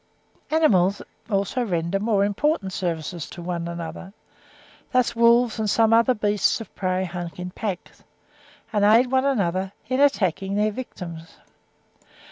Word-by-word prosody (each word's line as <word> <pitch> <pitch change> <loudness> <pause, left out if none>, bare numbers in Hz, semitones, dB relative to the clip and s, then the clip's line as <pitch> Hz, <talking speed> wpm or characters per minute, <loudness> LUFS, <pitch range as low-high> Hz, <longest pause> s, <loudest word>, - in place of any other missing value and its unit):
Animals 205 - +3 0.3
also 200 +4 0
render 175 -2 -1
more 205 -1 +2
important 205 - 0
services 170 -2 -3
to 175 - -9
one 170 -1 -3
another: 170 +3 -7 0.8
thus 255 -2 +2
wolves 235 0 +4
and 215 -1 0
some 225 +2 +3
other 230 +2 +4
beasts 210 -2 +1
of 225 - -10
prey 185 0 -1
hunt 175 -2 -6
in 180 0 -6
packs, 195 -2 -6 0.7
and 205 -1 +2
aid 230 +5 +5
one 260 0 +2
another 190 -7 0 0.2
in 255 +1 0
attacking 195 - +1
their 210 +1 +2
victims. 170 -8 -8
200 Hz, 135 wpm, -23 LUFS, 180-230 Hz, 0.8 s, aid